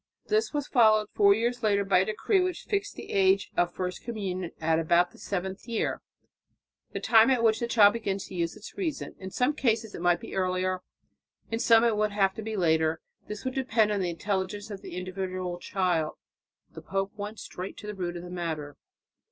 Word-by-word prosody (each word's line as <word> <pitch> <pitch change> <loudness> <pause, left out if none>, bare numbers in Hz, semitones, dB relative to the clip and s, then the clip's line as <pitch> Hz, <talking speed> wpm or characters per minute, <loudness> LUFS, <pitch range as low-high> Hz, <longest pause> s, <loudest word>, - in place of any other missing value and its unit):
This 435 +1 +2
was 290 -2 -2
followed 215 -4 +4
four 200 -1 +5
years 240 +3 -1
later 200 -3 +2
by 195 -2 +4
a 190 - +2
decree 370 - +1
which 365 0 -2
fixed 410 -1 -2
the - - -9
age 195 0 +3
of 175 0 +2
first 180 0 -4
communion 190 -6 -3
at 160 0 +2
about 170 +2 +3
the - - -18
seventh 190 +2 -4
year, 230 -2 -1 0.9
the - - -4
time 225 +1 +5
at 250 -3 +2
which 225 -1 +4
the 235 - -1
child 210 -4 +6
begins 200 -4 -3
to - - -11
use 170 -2 -2
its 215 +1 -11
reason. 340 -7 -3
In 190 - -6
some 250 +9 +1
cases 225 -6 0
it - - -7
might 175 -1 +3
be - - -9
earlier; 185 0 0 0.7
in 225 - -1
some 230 -1 +5
it 230 -2 +3
would 210 0 0
have 195 -2 +2
to 220 - -7
be 220 0 -4
later; 160 -2 +2 0.3
this 210 +2 -7
would 260 - -1
depend 240 -5 +2
on 205 - 0
the 180 - 0
intelligence 195 +4 -3
of 200 - -7
the - - -8
individual 185 -1 -4
child. 175 -5 0 0.6
The - - -10
pope 195 0 -2
went 210 +1 -6
straight 185 -1 -7
to - - -10
the 210 - -4
root 175 -3 -4
of 170 - -8
the 180 - -9
matter. 160 -5 -4
200 Hz, 210 wpm, -28 LUFS, 180-225 Hz, 0.9 s, child